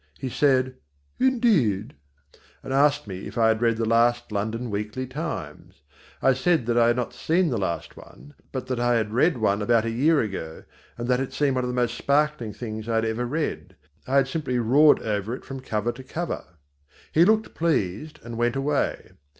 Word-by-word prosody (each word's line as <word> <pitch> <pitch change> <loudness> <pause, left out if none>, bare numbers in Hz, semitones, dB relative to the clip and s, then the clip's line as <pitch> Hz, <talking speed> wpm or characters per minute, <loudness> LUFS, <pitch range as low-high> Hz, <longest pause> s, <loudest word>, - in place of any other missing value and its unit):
He 130 - -4
said 130 -1 +2 0.4
"indeed," 205 - +2 0.7
and 135 - -4
asked 145 0 +3
me 95 -2 -7
if - - -9
I 115 -1 +4
had 110 0 +1
read 115 -1 +2
the 115 - 0
last 120 +1 +2
London 110 +3 -3
Weekly 105 +5 -3
Times. 125 - -7 0.4
I 135 - +5
said 145 0 +1
that 120 0 0
I 120 -1 +5
had 120 - +3
not 125 -1 -3
seen 170 +1 +1
the 120 -5 -1
last 85 -3 -3
one; 145 - -15 0.2
but 130 -2 -4
that 130 -2 -3
I 120 0 +2
had 110 -2 -1
read 150 +5 +3
one 105 -2 +1
about 115 +1 +2
a 115 - -1
year 145 +7 +3
ago 95 -8 -4 0.3
and 120 0 -4
that 125 0 +2
it 135 - -4
seemed 145 -2 +1
one 130 -1 0
of - - -2
the 125 - -3
most 120 -1 0
sparkling 145 -5 +1
things 110 0 -6
I 115 - 0
had 115 0 +2
ever 115 +2 -2
read; 155 +4 -3 0.3
I 130 - 0
had 135 -1 +4
simply 135 -4 -2
roared 135 +6 +5
over 105 +2 -2
it - - -12
from 135 0 -7
cover 115 -3 -2
to 130 +2 -11
cover. 170 +6 -4 0.7
He 165 - +5
looked 220 +3 +2
pleased 155 - -1
and 115 -1 -7
went 120 +2 +1
away. 140 +1 -1
120 Hz, 200 wpm, -25 LUFS, 110-140 Hz, 0.7 s, I